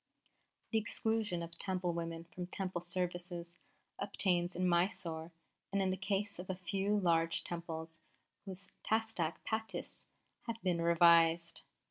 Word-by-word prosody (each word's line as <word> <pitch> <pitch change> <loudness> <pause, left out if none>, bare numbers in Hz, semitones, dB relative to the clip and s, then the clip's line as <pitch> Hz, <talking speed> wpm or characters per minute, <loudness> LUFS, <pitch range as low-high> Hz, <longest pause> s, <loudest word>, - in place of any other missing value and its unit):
"The 225 - +4
exclusion 215 -4 0
of 170 0 -9
Temple 185 -2 0
women 165 -1 -3
from 180 -1 -4
Temple 185 -2 -3
services 175 -1 -2 0.5
obtains 175 -2 +1
in 180 +1 +1
Mysore 170 -2 +1 0.4
in 195 -1 +2
the - - 0
case 200 +1 -1
of 180 - -7
a 185 - 0
few 195 +3 0
large 165 -3 +3
Temples 165 -1 -5 0.5
whose 195 0 -7 0.2
Tasdik 220 -7 +1
Pattis 220 0 -3 0.4
have 230 -1 -3
been 175 -3 +1
revised. 170 0 +5
175 Hz, 125 wpm, -35 LUFS, 170-195 Hz, 0.5 s, revised